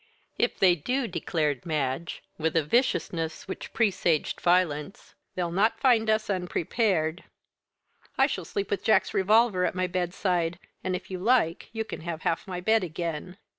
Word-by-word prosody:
"If - - +1
they 185 -2 +5
do," 250 - -1
declared 155 - -1
Madge, 155 0 -2 0.2
with 160 +1 0
a 165 - +3
viciousness 165 - 0
which 190 - -6
presaged 185 -8 +1
violence, 175 -1 0 0.2
"they'll 175 -2 -1
not 205 +6 +2
find 230 -5 +3
us 215 0 +2
unprepared. 180 -2 0 0.9
I 270 - +6
shall 230 -10 -3
sleep 195 +3 -3
with 205 - -1
Jack's 220 - +3
revolver 210 -1 +3
at - - 0
my 185 0 +1
bedside, 175 -1 -1 0.3
and 185 0 -1
if 180 - -7
you 185 - -4
like 210 -5 +2
you 225 0 -3
can - - -7
have 165 -1 -5
half 165 - -1
my 180 -2 -4
bed 220 +3 +2
again." 170 +1 -4
180 Hz, 160 wpm, -27 LUFS, 165-210 Hz, 0.9 s, I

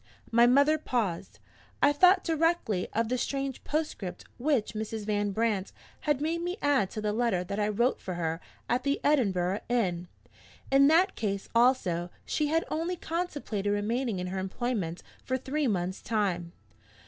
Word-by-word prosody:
'" - - -26
My 235 +1 +6
mother 285 +5 +4
paused. 220 - -2 0.4
I 285 - +5
thought 365 +5 +5
directly 325 - +1
of 230 +1 0
the 250 +2 -1
strange 275 0 -3
postscript 290 - -3
which 265 -5 +1
Mrs. 220 0 -4
Van 205 -1 0
Brandt 205 -2 0 0.4
had 290 -3 +3
made 330 +2 -1
me 355 +2 -3
add 275 -10 +2
to 215 - -5
the 210 -1 -1
letter 225 -6 +1
that 200 +3 -4
I 210 - +2
wrote 235 +5 +1
for 185 - -4
her 165 0 -2 0.3
at 245 +2 +1
the 280 +2 0
Edinburgh 195 -9 +2
inn. 180 -8 0 0.6
In 275 +1 +6
that 355 +6 +4
case 200 -2 -3
also 230 -8 +2 0.2
she 300 - 0
had 325 +2 +1
only 330 +3 -1
contemplated 300 - -3
remaining 220 +2 -1
in 180 - -3
her 190 +1 -3
employment 190 -3 -3 0.2
for 260 - -1
three 275 +3 -1
months' 185 -3 -1
time. 190 -6 -1
230 Hz, 165 wpm, -29 LUFS, 195-285 Hz, 0.6 s, My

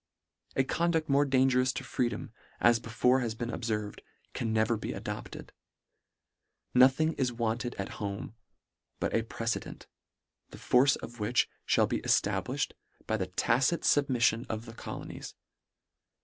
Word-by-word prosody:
A 135 - +3
conduct 165 +2 0
more 140 +1 +4
dangerous 130 -1 +3
to - - -5
freedom, 120 -2 -2 0.3
as 120 -1 +5
be 115 - -10
fore 125 +4 +3
has 115 -3 -2
been 120 +1 -4
obferved, 105 -3 -3 0.3
can 115 - -2
never 110 +1 +2
be 110 - -4
adopt - - -6
ed. - - -10 1.2
Nothing 135 +6 +5
is 130 -2 +1
wanted 120 +1 -2
at 100 - -4
home 100 +1 -4 0.7
but - - -1
a 115 - +3
pre 115 0 -6
cedent, 115 - -3 0.6
the - - -11
force 135 +2 +4
of 120 0 -9
which 105 +4 +1 0.2
fhall - - +4
be - - -1
eftabliuh - - +1
ed, - - -23 0.3
by 110 - 0
the 95 -4 -2
tacit 120 - +1
fubmiffion 125 -4 +2
of 110 +1 -4
the 115 - -10
colonies. - - -8
120 Hz, 150 wpm, -30 LUFS, 110-130 Hz, 1.2 s, as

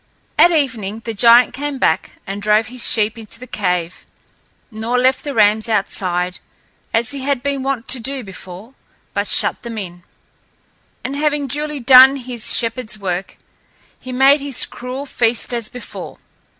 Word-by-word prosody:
At 345 - +5
evening 225 - -2
the 230 - -4
giant 235 +3 +4
came 290 +1 -5
back 160 - -2
and 200 +1 -7
drove 215 +2 +1
his 255 - +6
sheep 220 0 +2
into 225 +1 -9
the 255 - -10
cave, 180 -6 -4 0.7
nor 225 +3 -3
left 260 +1 +1
the 285 -2 -6
rams 215 +1 +2
outside, 180 -4 -2 0.5
as 230 +2 -1
he 280 - -3
had 270 -2 -2
been 280 -1 -3
wont 265 -2 -4
to 260 - +8
do 265 +2 -2
before, 190 +3 -12 0.4
but - - -3
shut - - +4
them 235 -2 -8
in. 175 -4 -8 1.0
And 265 +2 -5
having 295 0 -1
duly 295 +2 -4
done 260 +2 +6
his 245 -4 +2
shepherd's 230 -2 0
work, 185 -2 -5 0.6
he 255 - -10
made 270 +3 +3
his 280 -3 +3
cruel 255 +3 -8
feast 240 -2 -1
as 230 -3 0
before. 250 - -10
235 Hz, 160 wpm, -16 LUFS, 215-270 Hz, 1.0 s, to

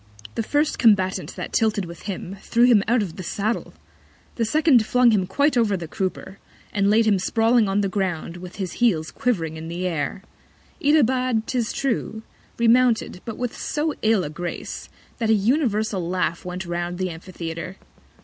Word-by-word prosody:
The - - -1
first 290 +7 0
Combatant 190 -4 +2
that - - -6
tilted 215 -3 +1
with 170 0 -10
him, 195 0 -5
threw 235 0 +2
him 240 -4 +6
out 235 -1 +3
of 175 -5 -7
the - - -5
Saddle; 210 +5 -2 0.6
the 230 - -1
second 300 -2 +4
flung 250 +2 +4
him 195 -4 +1
quite 285 +8 +2
over 220 -5 +2
the 170 -2 -6
Crupper, 190 +2 -4 0.3
and 200 -1 +2
laid 220 +2 +4
him 205 -3 +3
sprawling 225 +2 +2
on 200 +1 +1
the 200 - +1
Ground, 180 -4 -2
with 180 0 -9
his 185 -4 -5
Heels 165 -10 +2
quiv'ring 165 -10 -1
in 160 +1 -7
the 175 +2 -4
Air. 175 +2 -2 0.6
Itobad, 255 -5 +3
'tis 240 -3 -1
true, 230 -4 -2 0.3
remounted, 235 -4 +3
but 225 - -6
with 245 -1 -3
so 305 0 -2
ill 220 -3 +3
a 150 - -5
Grace, 175 +2 -6 0.3
that 225 -2 0
an 220 - +5
universal 215 - 0
Laugh 180 -2 -1
went 180 +1 -5
round 175 0 -3
the 185 -1 -2
Amphitheatre. 170 +1 -7
205 Hz, 175 wpm, -23 LUFS, 180-235 Hz, 0.6 s, him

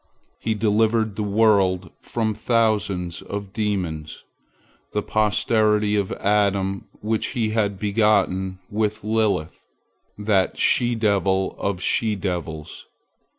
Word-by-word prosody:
He 110 -1 -1
delivered 110 0 +1
the 105 - -3
world 100 -4 +2
from 110 -2 -1
thousands 105 -6 0
of 100 -1 -6
demons, 90 -8 -3 0.7
the 105 - 0
posterity 105 0 +2
of 100 -2 0
Adam 100 -1 0
which 110 +1 -1
he 115 -5 0
had 105 -3 0
begotten 100 -3 +1
with 105 0 -1
Lilith, 105 -7 0 0.5
that 100 -2 +1
she 120 -1 +3
devil 100 -3 +1
of 95 -2 -2
she 110 -2 +1
devils. 85 -5 -5
105 Hz, 110 wpm, -23 LUFS, 95-110 Hz, 0.7 s, she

